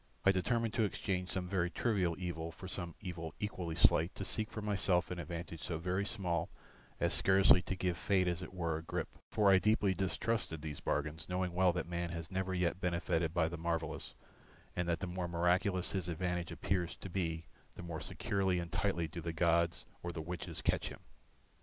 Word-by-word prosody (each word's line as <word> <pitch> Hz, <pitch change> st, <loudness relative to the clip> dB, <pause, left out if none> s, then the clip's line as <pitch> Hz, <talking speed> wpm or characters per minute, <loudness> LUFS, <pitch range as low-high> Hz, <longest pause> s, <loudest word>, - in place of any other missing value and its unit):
I 95 Hz, -, +8 dB
determined 115 Hz, +4 st, +1 dB
to 115 Hz, -, +2 dB
exchange 95 Hz, -2 st, -1 dB
some 90 Hz, -1 st, -1 dB
very 90 Hz, -2 st, +1 dB
trivial 95 Hz, -4 st, +1 dB
evil 85 Hz, -3 st, -3 dB
for 95 Hz, -, -9 dB
some 85 Hz, -3 st, -4 dB
evil 85 Hz, -5 st, -5 dB
equally 90 Hz, -6 st, -3 dB
slight, 80 Hz, +1 st, +4 dB
to 95 Hz, -, -4 dB
seek 110 Hz, +3 st, -1 dB
for 110 Hz, -, -5 dB
myself 95 Hz, -4 st, +2 dB
an 90 Hz, -, -3 dB
advantage 85 Hz, 0 st, -5 dB
so 85 Hz, -, -2 dB
very 90 Hz, +4 st, 0 dB
small 85 Hz, -3 st, -1 dB, 0.5 s
as -, -, +3 dB
scarcely 95 Hz, -1 st, +6 dB
to 95 Hz, -, -3 dB
give 90 Hz, -2 st, 0 dB
Fate 95 Hz, 0 st, +3 dB
as 85 Hz, 0 st, 0 dB
it -, -, -7 dB
were 85 Hz, -4 st, -1 dB
a -, -, -5 dB
grip, 80 Hz, -, -3 dB, 0.2 s
for 105 Hz, -2 st, +4 dB
I 95 Hz, -, +7 dB
deeply 105 Hz, -2 st, +3 dB
distrusted 95 Hz, -2 st, -1 dB
these 75 Hz, -2 st, -4 dB
bargains, 75 Hz, +2 st, -2 dB
knowing 90 Hz, -1 st, 0 dB
well 90 Hz, 0 st, +5 dB
that 90 Hz, -, -1 dB
man 85 Hz, 0 st, -2 dB
has 85 Hz, 0 st, -5 dB
never 95 Hz, 0 st, -1 dB
yet 90 Hz, +1 st, 0 dB
benefited 85 Hz, -2 st, +1 dB
by 85 Hz, -2 st, +2 dB
the 85 Hz, 0 st, -5 dB
marvellous 80 Hz, -2 st, -2 dB, 0.6 s
and 90 Hz, 0 st, 0 dB
that 85 Hz, -, 0 dB
the -, -, 0 dB
more 90 Hz, 0 st, -3 dB
miraculous 90 Hz, +2 st, +2 dB
his 90 Hz, -3 st, -2 dB
advantage 90 Hz, 0 st, -1 dB
appears 90 Hz, -3 st, -1 dB
to -, -, -8 dB
be 85 Hz, -3 st, -2 dB, 0.3 s
the -, -, -8 dB
more 85 Hz, -2 st, -5 dB
securely 95 Hz, -2 st, 0 dB
and 85 Hz, -1 st, -3 dB
tightly 90 Hz, -2 st, +1 dB
do 85 Hz, +2 st, -6 dB
the 85 Hz, 0 st, -3 dB
gods 85 Hz, +1 st, +2 dB, 0.2 s
or 85 Hz, -, -3 dB
the 85 Hz, -, -5 dB
witches 90 Hz, +2 st, -5 dB
catch -, -, +2 dB
him. -, -, -8 dB
90 Hz, 200 wpm, -35 LUFS, 85-95 Hz, 0.6 s, I